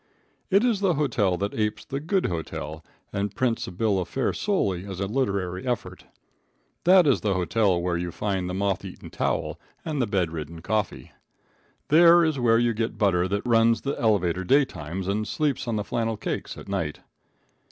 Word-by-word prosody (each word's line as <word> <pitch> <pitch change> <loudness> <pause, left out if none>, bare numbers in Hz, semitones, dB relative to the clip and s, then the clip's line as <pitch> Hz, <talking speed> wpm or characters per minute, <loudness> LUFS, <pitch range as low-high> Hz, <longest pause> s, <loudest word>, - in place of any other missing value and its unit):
It 200 +2 +4
is 235 -5 +2
the 190 -4 +2
hotel 110 -11 +1
that 100 +3 -2
apes 105 0 -2
the 135 - -4
good 180 +6 0
hotel 80 -2 -4 0.3
and 100 0 -2
prints 125 -3 0
a - - -6
bill 100 +1 +1
of 90 - -3
fare 130 -2 0
solely 100 - 0
as 95 -2 -7
a 100 - 0
literary 100 -4 -2
effort. 120 -3 -4 0.8
That 180 0 +7
is 140 -4 +3
the 100 -3 0
hotel 95 +1 +2
where 85 0 -1
you 90 0 -3
find 95 -1 -2
the 90 - -3
moth 100 -1 0
eaten - - -9
towel - - -2 0.3
and 155 -4 -1
the 120 - +1
bed 95 -5 0
ridden 80 +1 -7
coffee. 105 0 -2 0.8
There 170 +2 +7
is 155 -4 0
where 115 -2 +4
you 120 0 +2
get 110 0 -2
butter 95 -4 +2
that 100 +4 -2
runs 115 -1 +3
the 140 - -2
elevator 95 -5 +2
day 135 +8 +4
times 90 - -6
and 105 +2 -1
sleeps 145 -5 -1
on 115 - -1
the 105 - -1
flannel 115 0 -2
cakes - - -4
at - - -10
night. 95 -7 -3
105 Hz, 190 wpm, -25 LUFS, 95-130 Hz, 0.8 s, That